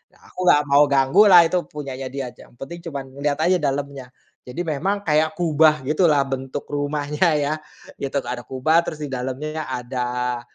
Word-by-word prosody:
Aku 185 - -8
nggak 150 -3 +5
mau 140 +1 +6
ganggulah, 170 +7 +6
itu 180 +2 0
punyanya 135 -3 -6
dia 135 -2 -5
ja, - - -16
yang - - -24
penting 170 +6 -8
cuman 140 -4 -5 0.2
lihat 145 -1 +1
aja 185 +1 +3
dalamnya. 140 -2 -3 0.4
Jadi 140 +8 -5
memang 195 +7 -1
kayak 155 +1 +2
kubah 155 -3 +3
gitulah 150 -2 +3
bentuk 135 +1 -4
rumahnya 145 +3 -1
ya. 145 +1 0 0.5
Itu 140 0 -2
ada 125 0 -5
kubah, 155 +6 +2
terus 155 - -5
di 145 - -5
dalamnya 135 +4 -4
ada 125 -1 -3
145 Hz, 165 wpm, -22 LUFS, 135-155 Hz, 0.5 s, mau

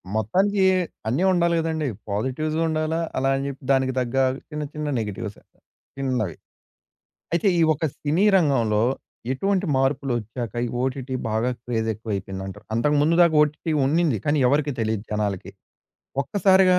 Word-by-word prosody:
మొత్తానికి 190 - +2 0.4
అన్నీ 135 +11 +1
ఉండాలి 170 -1 +2
గదండి! 160 -2 -1 0.2
పాజిటివ్స్ 130 +9 -1
ఉండాలా, 160 +1 0 0.2
అలా 135 +1 +2
అని 135 - -2
జెప్పి 140 0 -7
దానికి 130 -1 +2
తగ్గ 125 0 -2 0.3
చిన్న 150 -1 -4
చిన్న 150 -1 -3
నెగెటివ్స్. 105 -1 -5 0.6
చిన్నవి. 125 - -1 1.0
అయితే 170 +4 +2
ఈ - - +5
ఒక్క 155 +2 -3
సినీ 155 +7 +1
రంగంలో 120 - +2 0.5
ఎటువంటి 195 +6 0
మార్పులొచ్చాక 125 -4 -1
ఈ - - -3
ఓటిటి 130 0 -2
బాగా 110 +3 0
క్రేజ్ 115 -2 -2
ఎక్కువైపోయిందంటావు. 100 -1 -5
అంతకు 145 +6 +2
ముందు 155 +3 +3
దాకా 165 -2 +4
ఓటిటి 150 +2 -1
ఉన్నింది 155 - +2
కానీ 150 +1 +2
ఎవరికీ 145 +1 +2
తెలీదు 110 -1 -1
జనాలకి. 100 -3 -2 0.7
ఒక్కసారిగా 190 +1 +4
135 Hz, 130 wpm, -24 LUFS, 110-160 Hz, 1.0 s, ఈ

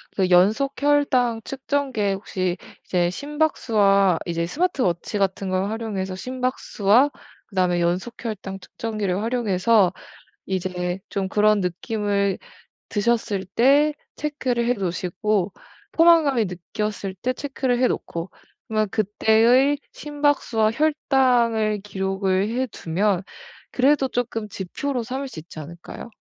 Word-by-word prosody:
그 190 -2 +1
연속 215 +11 +3
혈당 260 -6 +2
측정기에 265 -7 -1
혹시 185 -2 -2 0.3
이제 175 -1 +1
심박수와 205 - +2
이제 170 -1 -1
스마트 320 - 0
워치 175 +4 -1
같은 195 -1 -1
걸 185 +1 0
활용해서 205 -4 -3
심박수와 255 +1 +1 0.4
그다음에 180 -3 +1
연속 180 +7 -1
혈당 195 -3 -5
측정기를 205 -3 -3
활용해서 220 -4 +2 0.5
이제 180 -1 -2
좀 195 -1 -2
그런 210 0 +3
느낌을 200 +1 -1 0.5
드셨을 210 -2 0
때 280 +9 +4 0.2
체크를 260 -5 -1
해 - - +3
놓으시고 190 +1 -1 0.4
포만감을 320 -9 +5
느꼈을 195 +2 -4
때 250 +7 -2
체크를 265 -3 -1
해 255 - +4
놓고 170 +2 -4 0.4
그러면 215 -1 +1
그때의 225 +6 +3
심박수와 290 -7 +1
혈당을 240 -7 +2
기록을 195 0 -1
해 255 +3 -1
두면 190 0 -1 0.5
그래도 270 +1 +3
쪼끔 230 -3 -3
지표로 245 +8 -3
삼을 265 +4 -4
수 200 -11 -8
있지 160 +1 -13
않을까요? 170 +8 -9
215 Hz, 275 characters per minute, -23 LUFS, 190-255 Hz, 0.5 s, 포만감을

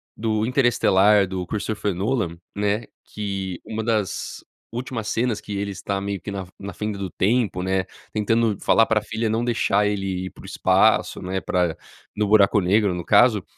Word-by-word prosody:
do 110 -1 0
Interestelar, 105 -6 +4
do 90 -1 -4
Christopher 105 -1 -2
Nolan, 95 -4 -1 0.2
né, 105 +2 0 0.2
que 95 -3 -4
uma 110 0 -4
das 110 -4 -2 0.3
últimas 120 -2 -4
cenas 115 -2 0
que 100 - -5
ele 100 0 -2
está, 100 +1 -3
meio 100 -1 -3
que - - -7
na 100 - -4
f 90 - -20
na 100 -1 -7
fenda 105 +2 -4
do 95 - -3
tempo, 105 -3 0
né, 95 0 0 0.3
tentando 110 0 +1
falar 115 - +4
para 110 -1 +2
a - - -12
filha 110 +1 -2
não 115 +2 0
deixar 105 -3 +2
ele 95 -2 -2
ir - - -5
para - - -15
o - - -11
espaço, - - +2
né, 95 +1 -3
pra 90 -3 0 0.4
no 105 0 0
buraco 105 0 +5
negro, 100 +1 +2
no 90 -1 -4
caso, 105 +1 +4
105 Hz, 185 wpm, -23 LUFS, 95-110 Hz, 0.4 s, buraco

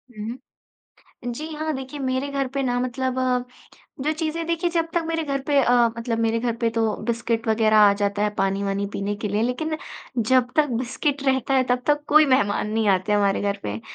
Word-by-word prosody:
हुँ। 220 +4 -5 1.0
जी 305 +6 -6
हाँ, 310 +1 -2
देखिए 265 +2 -7
मेरे 260 0 -1
घर 275 -1 -1
पे 275 - 0
ना 245 -1 0
मतलब 255 +1 -2 0.9
जो 305 - +2
चीज़ें 320 +1 -3
देखिए 335 +1 0
जब 330 -1 0
तक 340 - +2
मेरे 325 0 -1
घर 275 -2 -2
पे 285 +1 +2
अ, 245 - +3 0.3
मतलब 230 0 -2
मेरे 230 0 +1
घर 235 -1 -1
पे 230 -1 +1
तो 225 -2 0
बिस्किट 230 0 -1
वग़ैरह 220 -1 +3
आ 205 -1 +7
जाता 200 0 -1
है 210 - +2
पानी-वानी 195 +1 0
पीने 200 +1 -2
के 210 0 -4
लिए 205 +2 0
लेक़िन 285 +7 -1 0.5
जब 255 -1 +3
तक 305 -1 +4
बिस्किट 270 +3 -2
रहता 265 0 +1
है 260 - +4
तब 250 0 +1
तक 295 0 +2
कोई 305 +1 +7
मेहमान 210 -6 +2
नहीं 220 -1 +1
आते 190 +1 +2
हमारे 200 -1 +2
घर 200 0 0
पे, 105 +1 -4
245 Hz, 200 wpm, -23 LUFS, 210-280 Hz, 1.0 s, आ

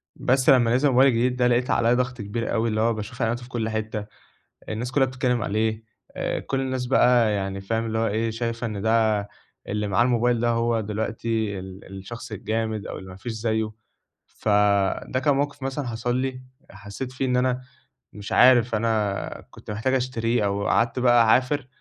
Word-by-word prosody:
بس 130 +3 +2
لمّا 120 -3 +5
نزل 145 +3 +3
الموبايل 130 +2 +5
الجديد 125 +2 +1
ده 125 -1 +2
لقيت 125 +1 +1
عليَّ 115 +1 +3
ضغط 125 -2 -2
كبير 110 +3 -3
أوي، 115 +1 +1
اللي 110 0 0
هو 115 0 +2
باشوف 115 +4 -7
إعلاناته 120 +2 -1
في 125 - -12
كُلّ 115 -3 -2
حتة 110 -1 -3 0.6
الناس 115 +3 -3
كلّها 135 0 +3
بتتكلم 125 -2 -1
عليه 110 +1 -1 0.3
آآ، - - -2
كُلّ 135 - -3
الناس 130 -1 -2
بقى 120 -3 +4
يعني 95 -1 -3
فاهم 115 +3 -2
اللي 110 0 -2
هو 115 - +1
إيه 110 +2 -1
شايفة 115 +1 -3
إن 105 -2 -5
ده 110 -2 +2 0.4
اللي 105 0 -2
معاه 100 +4 +3
الموبايل 120 -1 +2
ده 120 0 +1
هو 115 0 +1
دلوقتي 110 -1 -2
ال 95 0 -10
الشخص 110 +4 -9
الجامد، 110 0 -3
أو - - -6
اللي 95 0 -10
ما 95 - -10
فيش 110 +5 -6
زيه 110 -1 -1 0.6
ف - - -7 0.6
ده 130 - -1
كان 145 0 +2
موقف 145 0 -2
مثلًا 135 0 -3
حصل 120 +1 -2
لي، 130 0 -3 0.3
حسّيت 100 +6 -7
فيه 130 +1 -3
إن 125 -1 +1
أنا 125 0 +1 0.5
مش 105 -1 -8
عارف 120 -2 +5
أنا 105 -2 -1
كنت - - -10
محتاج 115 +5 -1
أشتريه 120 -3 0
أو 100 0 -1
قعدت 115 +3 +1
بقى 120 -1 +5
أعافر 130 +4 +2
115 Hz, 190 wpm, -24 LUFS, 110-125 Hz, 0.6 s, لمّا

